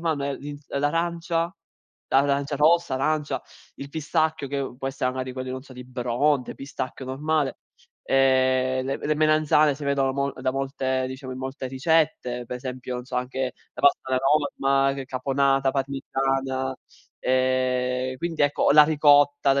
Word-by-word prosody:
vanno 155 -4 -1
è 140 -1 -2
l'ins 145 0 -9
l'arancia, 165 +4 -1 0.5
l'arancia 140 +1 +2
rossa, 160 -2 +3
l'arancia 150 +2 -1 0.3
il 140 - -8
pistacchio 155 -1 -1
che 140 -2 -3
può 135 - -2
essere, 130 -1 -1
magari, 130 0 -4
quello 130 0 -5
di, - - -3
non 130 0 -6
so, 135 - -14
di 125 0 -9
Bronte, 125 +2 0
pistacchio 135 -1 -6
normale. 145 +2 -1 0.5
Ehm, 130 -1 +2
le 135 - -1
m - - -10
le 155 - +2
melanzane 155 -1 +3
si 145 - -7
vedono 135 -1 +1
mo 140 +1 -1
da 130 - -2
molte 135 -1 -1
diciamo, 130 0 -7
in 130 - -7
molte 130 0 -5
ricette, 130 -3 0
per 125 0 -5
esempio, 125 0 -6
non 125 - -6
so, 130 - -8
anche 130 0 -2 0.2
la - - -8
pasta 140 - +5
alla 130 - +2
Norma, 135 -1 +2
c 135 -1 -5
caponata, 135 +1 +1
parmigiana. 135 -1 -1 0.4
Ehm, 130 0 0
quindi 165 -2 -2
ecco 145 0 +3
la 150 0 +9
ricotta, 145 -2 +4
la 140 - +2
135 Hz, 160 wpm, -25 LUFS, 130-145 Hz, 0.5 s, la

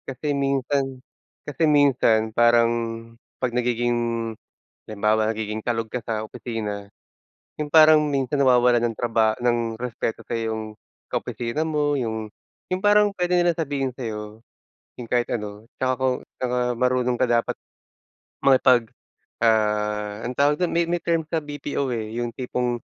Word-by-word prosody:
Kasi 140 +3 -3
minsan 135 -1 0 0.5
kasi 150 +3 -3
minsan 125 -7 +3
parang 120 0 +5 0.7
'pag 125 -2 -2
nagiging 120 -1 0 0.5
halimbawa 110 +1 +1
nagiging 110 -1 -3
kalog 115 -2 -1
ka 125 - -4
sa 110 -2 -2
opisina, 105 -3 -5 0.7
yung 150 -1 -3
parang 155 -1 +8
minsan 135 0 0
nawawalan 125 -2 +4
ng 115 -2 -1
traba 115 -2 +1
ng 120 -2 0
respeto 120 -2 -3
sayo 115 -1 -2
yung 110 0 -3 0.5
ka-opisina 120 +6 -2
mo, 150 -2 0
yung 110 -4 -3 0.4
yung 185 0 -1
parang 205 0 +5
puwede 180 0 +1
nilang 175 -2 +2
sabihin 140 -4 -2
sa'yo 110 -3 -6 0.6
yung 120 - -7
kahit 120 -1 +1
ano, 105 -1 -5
tsaka 130 0 +1
kung 130 -1 +1 0.2
tsaka 125 -1 -1 0.2
marunong 125 0 +1
ka 130 - +3
dapat, 120 -1 +1 0.9
makipag, 130 -4 +4 0.5
ah, 105 -2 +1
anong 125 - -5
tawag 145 +1 +4
dun 180 - +1
may 170 0 +3
may 175 +1 -1
term 165 -1 0
sa 160 +1 -1
BPO, 145 -2 -4
eh, 110 0 -4
yung 120 0 -2
tipong, 125 -1 -2
120 Hz, 140 wpm, -23 LUFS, 115-140 Hz, 0.9 s, parang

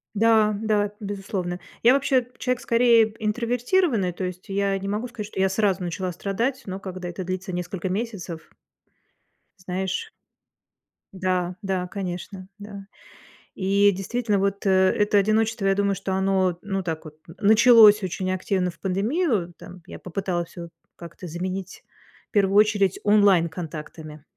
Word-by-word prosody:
Да, 220 0 +4
да, 210 -2 +1
безусловно. 195 -3 -4 0.2
Я 240 +2 +6
вообще 265 -3 +2
человек 250 -1 -1
скорее 235 -1 +4
п 215 - -14
интровертированный, 240 - +1
то 185 - -6
есть 180 0 -6
я 195 0 0
не 195 0 -6
могу 210 +5 -2
сказать, 240 -4 -7
что 210 - -7
я 190 - +3
сразу 195 -1 +1
начала 180 +1 -3
страдать, 225 +9 -2
но 190 0 -5
когда 185 -2 -6
это 175 +2 -6
длится 185 +1 -4
несколько 180 +1 -4
месяцев 190 -5 -5 1.1
знаешь. 190 - -3 1.0
Да, 185 -1 -1
да, 190 -2 -2
конечно. 185 0 -6
Да. 200 -1 -10 0.7
И 200 +1 +3
действительно, 210 +3 -1
вот, 200 +1 -1
э, - - +4
это 190 +2 +3
одиночество, 215 +1 +1
я 195 - +4
думаю, 200 0 +1
что 190 0 -4
оно, 190 -2 +1
ну, 195 -2 -3
так 160 -2 -4
вот 155 0 -11 0.2
началось 220 -1 +7
очень 185 0 -2
активно 185 0 -1
в 170 -1 -12
пандемию 200 - 0
там. 180 0 -12
Я - - -9
попыталась 180 -2 -3
всё 170 -1 -9 0.3
как-то 175 +1 -10
заменить 185 +3 -5 0.5
в - - -67
первую 200 -2 +2
очередь 205 -3 +3
онлайн-контактами. 165 -6 0
195 Hz, 145 wpm, -24 LUFS, 185-215 Hz, 1.1 s, началось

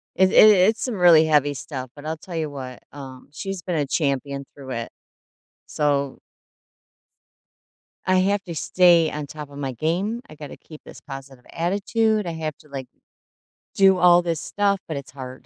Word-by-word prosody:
It 190 0 +4
i - - -6
it's 215 +1 +6
some 250 -4 -2
really 170 -4 +6
heavy 145 -2 +2
stuff, 130 -2 -7
but 145 0 -12
I'll 160 +1 -3
tell 175 +3 -10
you 160 -2 -2
what, 130 -3 -8
um, 135 -3 -11
she's 195 +5 -6
been 175 0 -3
a 150 -2 0
champion 140 -1 -2
through 135 -2 -10
it. 115 -2 -4 0.8
So 140 -2 -1 1.9
I 185 - +2
have 195 +2 +1
to 170 -2 -7
stay 170 0 +4
on 150 -1 -5
top 150 -1 -9
of 140 - -12
my 135 -2 -3
game, 175 - -2
I 155 - -12
gotta 150 -1 -10
keep 155 -2 -14
this - - -13
positive 135 -2 -10
attitude, 210 +5 0
I - - -2
have 155 -2 -5
to, 150 - -20
like, 135 -2 -6 0.9
do 195 -1 +5
all 175 0 +6
this 170 -3 -2
stuff, 200 -1 0
but 155 - -4
it's 140 - -8
hard. 130 -1 -10
155 Hz, 180 wpm, -23 LUFS, 140-185 Hz, 1.9 s, it's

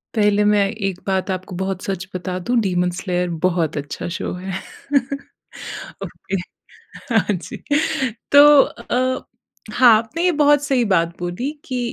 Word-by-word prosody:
पहले 210 -1 +3
मैं 205 -1 +4 0.2
एक 185 -1 -4
बात 190 0 0
आपको 185 0 -5
बहुत 190 0 -3
सच 190 -1 -4
बता 185 0 -3
दूँ। 245 - +1
डीमन 180 -3 +1
स्लेयर 180 -2 -1 0.2
बहुत 165 -4 -1
अच्छा 145 +3 -5
शो - - -4
है। 185 +1 -6 1.5
ओके 195 - -6 0.8
हाँ 210 -1 +2
जी 180 - -6 0.7
तो 285 +1 +9 0.2
अ, 255 +2 -2 0.5
हाँ, 240 -3 +7
आपने 235 +10 -3
ये 360 - +4
बहुत 290 0 +4
सही 265 -4 +1
बात 170 -2 +1
बोली 180 +11 -3
कि 255 -2 -3
195 Hz, 140 wpm, -20 LUFS, 180-240 Hz, 1.5 s, तो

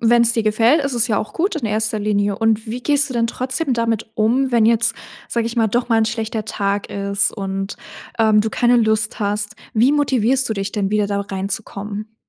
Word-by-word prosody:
Wenn's 235 0 +4
dir 230 - 0
gefällt, 225 +8 +3
ist 275 -2 -2
es 235 0 +2
ja 215 -4 +1
auch 215 - -5
gut 375 +4 0
in 300 -8 -2
1. 215 +1 0
Linie 205 -1 0
und 225 -1 +1
wie 240 +3 -5
gehst 290 0 +2
du - - -3
denn 230 -1 +1
trotzdem 260 +4 -2
damit 230 -2 -1
um, 250 +5 +1
wenn 235 -3 +3
jetzt, 230 0 +3 0.3
sage 235 -1 -1
ich 230 0 -3
mal, 230 -2 +2
doch 240 +3 -1
mal 225 - +4
'n 220 - +2
schlechter 225 -1 -3
Tag 200 0 -2
ist 200 0 0
und, 195 -1 -4 0.4
ähm, 215 -1 +4
du 220 - 0
keine 240 +2 +2
Lust 220 -2 +1
hast? 205 0 -1 0.2
Wie 240 +5 +4
motivierst 265 -3 +1
du 220 - -1
dich 195 -1 -4
denn 200 -2 -1
wieder 210 -1 +1
da 200 0 -1
reinzukommen? 200 +2 -5
220 Hz, 215 wpm, -19 LUFS, 210-240 Hz, 0.4 s, Wenn's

